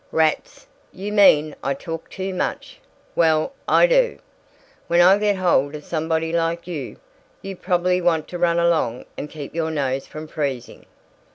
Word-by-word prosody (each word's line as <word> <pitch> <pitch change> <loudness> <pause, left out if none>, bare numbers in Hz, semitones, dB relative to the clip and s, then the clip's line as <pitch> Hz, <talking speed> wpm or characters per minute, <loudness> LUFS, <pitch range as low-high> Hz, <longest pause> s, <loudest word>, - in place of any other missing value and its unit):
"Rats. 160 -2 0 0.3
You 200 +3 -6
mean 155 -7 +5
I 135 0 0
talk 165 +3 -7
too 190 0 -5
much. 340 - -4 0.4
Well, 160 - +2
I - - +5
do, - - +2 0.7
when 170 +1 +2
I 185 +3 +6
get 205 -1 +2
hold 155 -6 +1
of 150 - -8
somebody 160 0 -2
like 170 0 -1
you. 155 -8 -6 0.5
You 195 0 -6
probably 180 0 0
want 165 -3 +1
to 175 - -6
run 170 -1 +2
along 165 -9 +1
and 150 - -6
keep 145 -2 -8
your 160 -1 -1
nose 135 -4 -2
from 155 +1 -8
freezing." 140 -6 -5
165 Hz, 160 wpm, -22 LUFS, 155-180 Hz, 0.7 s, I